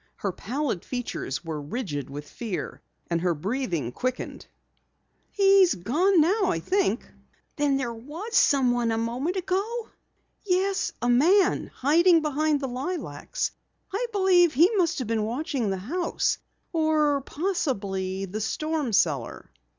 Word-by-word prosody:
Her 200 - -2
pallid 240 - -3
features 240 - -4
were 155 -2 -4
rigid 145 - -4
with 145 +2 -7
fear 220 -6 -5 0.3
and 170 -1 +1
her 175 -1 +1
breathing 175 - -2
quickened. 255 - -4 0.8
"He's 390 - +5
gone 315 - +2
now, 390 +7 +3
I 165 - 0
think." 245 - 0 0.5
"There 275 -5 0
was 315 - -7
someone 245 -4 +3
a 225 - 0
moment 245 +10 -2
ago?" 395 +5 -2 0.5
"Yes, 385 0 +1
a - - +2
man, 350 +11 +4
hiding 330 +4 +4
behind 300 0 +1
the 270 - -2
lilacs. 325 - -3 0.4
I 470 +5 -1
believe 370 - +4
he 340 - +6
must 355 -5 +2
have 255 - -3
been 225 -1 0
watching 245 0 -2
the 190 - -1
house 315 - -1 0.3
or 310 -3 +2
possibly 200 - -2
the 205 +4 -5
storm 305 +2 -2
cellar!" 145 -11 0
275 Hz, 130 wpm, -26 LUFS, 215-350 Hz, 0.8 s, he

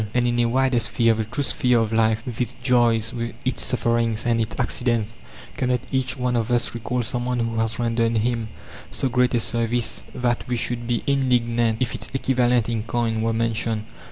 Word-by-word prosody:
And 120 -1 +3
in 120 0 0
a 120 - +4
wider 130 +1 +2
sphere, 115 +1 +2
the 110 0 -2
true 120 +6 -2
sphere 125 -2 +2
of 115 -1 -1
life, 110 0 +2
with 125 -1 -4
its 125 - -2
joys, 120 -3 +3 0.3
its 130 - 0
sufferings, 115 -2 0
and 115 -1 +2
its 110 - -3
accidents, 115 -2 0 0.4
cannot 125 -2 0
each 130 0 -1
one 125 -1 0
of 115 -1 0
us 120 -1 +1
recall 120 +1 -2
someone 125 +2 -2
who 115 -1 -1
has 115 0 -1
rendered 115 -1 +1
him 115 0 0 0.4
so 135 - -1
great 125 0 +2
a - - +3
service 115 0 -1
that 120 -1 -1
we 125 -1 -1
should 120 0 -2
be 120 -1 0
indignant 120 -4 +1
if 120 - -3
its - - -3
equivalent 125 -3 +2
in 115 -2 -1
coin 115 0 -1
were 115 0 +1
mentioned? 115 -1 -1
120 Hz, 190 wpm, -23 LUFS, 115-125 Hz, 0.4 s, a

